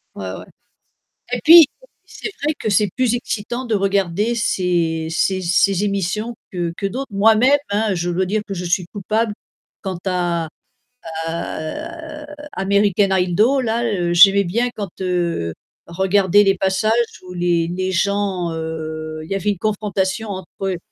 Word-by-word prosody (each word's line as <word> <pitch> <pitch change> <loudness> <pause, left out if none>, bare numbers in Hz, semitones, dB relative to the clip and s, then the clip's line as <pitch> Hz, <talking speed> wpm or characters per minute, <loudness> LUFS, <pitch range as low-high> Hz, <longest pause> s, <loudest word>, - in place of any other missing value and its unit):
Ouais, 95 -1 -5
ouais - - -8 0.9
et 245 - 0
puis 330 +1 +10 0.4
c'est - - -7
vrai 305 +2 +1
que 220 - -2
c'est 205 0 +3
plus 250 -2 +2
excitant 240 +1 -4
de 230 - -2
regarder 200 +2 +1
ces 170 -7 0
ces 185 +3 0
ces 190 +2 +2
émissions 205 +3 -2 0.2
que 175 -2 -2
que 195 - -3
d'autres. 260 +7 -3
Moi-même 225 +7 +5
hein, 210 -1 +1
je 175 +1 -1
dois 185 +2 0
dire 210 +2 0
que 200 - -4
je 180 -1 -4
suis 175 +1 0
coupable 215 +2 -1 0.5
quant 190 -3 -4
à 175 -3 0 0.8
à, 300 - -5
heu, - - -9 0.3
American 200 0 +2
Hido. 210 +10 +2
Là, 235 -1 -1
heu, 175 -6 0
j'aimais 195 +3 +7
bien 230 +7 0
quand, 205 -3 -4
heu, 175 - -1 0.3
je 170 - -11
regardais 190 +2 +4
les 195 -1 +3
passages 190 +3 +1 0.4
où 180 - -8
les 175 -1 +1
les 185 +2 -2
gens, 190 -1 0
heu, 155 -1 -5
il 160 - -12
y - - +1
avait 200 +2 0
une 200 - -4
confrontation 210 0 -1
entre 190 -3 -6
eux. 190 -2 -1
195 Hz, 160 wpm, -20 LUFS, 175-215 Hz, 0.9 s, puis